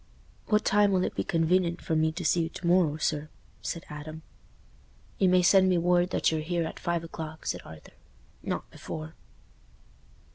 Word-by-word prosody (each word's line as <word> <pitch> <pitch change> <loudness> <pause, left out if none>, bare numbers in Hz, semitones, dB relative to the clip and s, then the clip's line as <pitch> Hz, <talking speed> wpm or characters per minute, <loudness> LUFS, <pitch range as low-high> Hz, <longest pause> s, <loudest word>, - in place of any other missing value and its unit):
"What 210 0 +2
time 205 0 +4
will 185 -1 +2
it - - -2
be - - -2
conven'ent 170 +1 +1
for 160 - -2
me 160 0 +2
to 175 +1 -5
see 170 - +3
you 165 - -1
to 175 - -9
morrow, 170 -4 +3
sir?" 150 -1 -1 0.3
said 170 - -4
Adam. 155 +1 -8 1.0
"You 190 - +4
may 180 0 +4
send 190 +1 +5
me 180 - +3
word 175 +1 +3
that - - +1
you're 160 -1 -1
here 170 +1 -1
at 160 - -7
five 170 -2 -1
o'clock," 160 -1 -8
said - - -2
Arthur; 80 -1 -13 0.5
"not - - -3
before." 155 +1 -7
170 Hz, 180 wpm, -28 LUFS, 160-180 Hz, 1.0 s, send